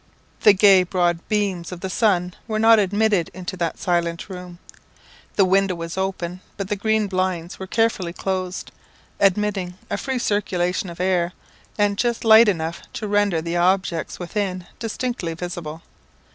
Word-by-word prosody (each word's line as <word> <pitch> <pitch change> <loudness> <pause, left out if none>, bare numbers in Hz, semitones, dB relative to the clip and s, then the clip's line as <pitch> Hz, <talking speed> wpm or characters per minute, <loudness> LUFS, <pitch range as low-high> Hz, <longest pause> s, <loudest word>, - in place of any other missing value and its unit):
The 210 - +7
gay 195 -1 +6
broad 175 -2 +1
beams 195 -5 -1
of 180 -1 -7
the 190 - -3
sun 180 -5 +1
were 215 -2 -1
not 225 0 +6
admitted 205 -2 +2
into 185 +1 -5
that 170 -2 -2
silent 170 0 -1
room. 180 -2 -8 0.8
The 195 - +5
window 190 0 +2
was 165 0 -6
open, 185 -2 -3 0.2
but 195 -1 -4
the 210 - 0
green 220 +1 +1
blinds 185 -3 -2
were 190 - -6
carefully 220 -5 0
closed, 185 0 -3 0.5
admitting 195 -2 +1 0.2
a - - 0
free 265 +4 -2
circulation 190 -4 0
of 170 - -10
air, 180 -1 +1 0.4
and 205 -1 +1
just 235 -1 0
light 220 +1 +8
enough 165 -3 -2
to 215 - -4
render 205 -5 +1
the 170 +1 -2
objects 180 -2 +1
within 185 0 -3
distinctly 225 -6 -3
visible. 170 -2 -6
185 Hz, 155 wpm, -22 LUFS, 175-205 Hz, 0.8 s, light